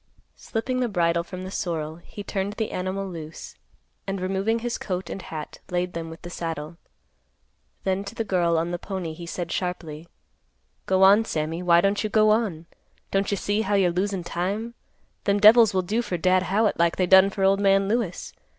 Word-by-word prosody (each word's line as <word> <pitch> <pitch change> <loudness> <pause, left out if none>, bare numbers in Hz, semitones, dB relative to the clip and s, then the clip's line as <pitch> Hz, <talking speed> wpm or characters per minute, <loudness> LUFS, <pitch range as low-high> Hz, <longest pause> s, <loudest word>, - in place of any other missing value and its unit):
Slipping 255 +3 -3
the 250 -2 0
bridle 170 -3 +1
from 185 +1 -8
the 185 - -7
sorrel, 160 -5 -3
he 200 +4 -10
turned 200 0 -3
the 220 0 -3
animal 190 +2 -3
loose, 160 -3 -8 0.5
and, 195 0 -2
removing 195 +4 0
his 235 +1 -3
coat 185 -1 -4
and 195 - -5
hat, 155 -3 -7
laid 180 0 -1
them 165 -1 -5
with 165 +2 -11
the 175 - -7
saddle. 165 -1 -5 1.1
Then 190 0 0
to 200 +3 -8
the 230 - -1
girl 175 -5 +1
on 165 +2 -1
the 175 - -3
pony 185 -5 -5
he 170 +1 -9
said 170 0 -4
sharply, 170 -3 -4 0.8
"Go 190 0 +3
on, 200 +3 +7
Sammy. 160 -1 -2
Why 170 -1 +5
don't 200 +3 +1
you 215 - -1
go 215 0 +4
on? 205 -8 0 0.5
Don't 195 0 +1
you 200 - 0
see 205 +2 0
how 205 -1 0
you're 185 -3 +3
losin' 190 +1 -1
time? 200 +7 -3 0.5
Them 200 0 +2
devils 220 +1 +8
will 185 -1 0
do 215 +6 0
for 185 -6 -3
Dad 185 +2 +3
Howitt 210 0 +1
like 170 0 +3
they 185 - +1
done 190 +2 +7
for 195 0 -3
old 195 +1 +4
man 195 -1 +3
Lewis. 215 -4 -2
190 Hz, 195 wpm, -25 LUFS, 170-205 Hz, 1.1 s, devils